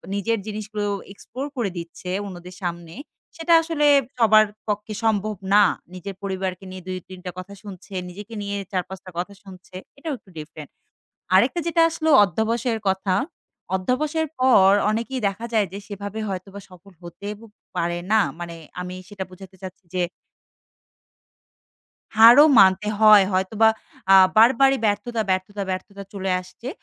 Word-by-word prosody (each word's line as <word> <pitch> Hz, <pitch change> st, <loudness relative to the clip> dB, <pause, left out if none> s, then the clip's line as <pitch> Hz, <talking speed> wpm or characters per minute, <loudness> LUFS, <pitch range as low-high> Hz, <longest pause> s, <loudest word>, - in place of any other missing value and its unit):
নিজের 225 Hz, +3 st, 0 dB
জিনিসগুলো 210 Hz, -1 st, -4 dB, 0.3 s
এক্সপ্লোর 255 Hz, +6 st, -7 dB
করে 225 Hz, -5 st, 0 dB
দিচ্ছে, 170 Hz, +2 st, -8 dB, 0.2 s
অন্যদের 180 Hz, -2 st, -9 dB
সামনে 170 Hz, -1 st, -5 dB, 0.4 s
সেটা 335 Hz, +1 st, +1 dB
আসলে 325 Hz, -2 st, -1 dB, 0.3 s
সবার 215 Hz, -1 st, +6 dB, 0.2 s
পক্ষে 210 Hz, +1 st, -3 dB
সম্ভব 215 Hz, -1 st, 0 dB, 0.2 s
না। 210 Hz, -, +7 dB, 0.3 s
নিজের 185 Hz, +1 st, -7 dB
পরিবারকে 190 Hz, -1 st, -4 dB
নিয়ে 185 Hz, -1 st, -9 dB
২ 185 Hz, -, -3 dB
৩ 185 Hz, -, -10 dB
টা 180 Hz, -, -4 dB
কথা 190 Hz, +2 st, -9 dB
শুনছে, 195 Hz, -1 st, -11 dB, 0.2 s
নিজেকে 205 Hz, +5 st, -10 dB
নিয়ে 200 Hz, 0 st, -3 dB
৪ 185 Hz, -2 st, 0 dB
৫ 190 Hz, +1 st, -8 dB
টা 185 Hz, -, -10 dB
কথা 185 Hz, +3 st, -4 dB
শুনছে। 185 Hz, -1 st, -14 dB, 0.2 s
এটাও 305 Hz, +2 st, -4 dB
একটু 200 Hz, -, -24 dB
ডিফারেন্ট। 150 Hz, -1 st, -9 dB, 0.7 s
আরেকটা 245 Hz, -, +4 dB
যেটা 335 Hz, 0 st, +3 dB
আসল 320 Hz, 0 st, -4 dB, 0.2 s
অধ্যাবসের 225 Hz, +5 st, -1 dB
কথা। 190 Hz, 0 st, 0 dB, 0.6 s
অধ্যাবসের 300 Hz, -, -1 dB
পর 200 Hz, -7 st, +6 dB, 0.2 s
অনেকেই 235 Hz, +4 st, -2 dB
দেখা 205 Hz, +4 st, -6 dB
যায় 215 Hz, -3 st, +2 dB
যে, 195 Hz, -, -6 dB
সেভাবে 205 Hz, +1 st, -6 dB
হয়তোবা 195 Hz, +1 st, -6 dB
সফল 185 Hz, +2 st, -16 dB
হতে 175 Hz, +4 st, -9 dB, 0.5 s
পারে 175 Hz, 0 st, -1 dB
না। 220 Hz, -, +5 dB, 0.2 s
মানে 170 Hz, -1 st, -6 dB, 0.3 s
আমি 180 Hz, 0 st, -6 dB
সেটা 200 Hz, -2 st, -6 dB
বুঝাতে 190 Hz, +1 st, -13 dB
চাচ্ছি 185 Hz, 0 st, -10 dB
যে 180 Hz, -, +1 dB, 2.2 s
হারও 240 Hz, +6 st, +9 dB, 0.2 s
মানতে 190 Hz, +2 st, +4 dB
হয়। 215 Hz, -2 st, +8 dB
হয়তোবা 205 Hz, +4 st, +3 dB, 0.4 s
আ -, -, +9 dB, 0.2 s
বারবারই 265 Hz, +4 st, +5 dB
ব্যর্থতা, 220 Hz, +3 st, -1 dB
ব্যর্থতা, 190 Hz, +2 st, -2 dB
ব্যর্থতা 200 Hz, +2 st, -6 dB
চলে 190 Hz, -2 st, -3 dB
আসছে। 205 Hz, +6 st, -10 dB
200 Hz, 145 wpm, -23 LUFS, 185-225 Hz, 2.2 s, হারও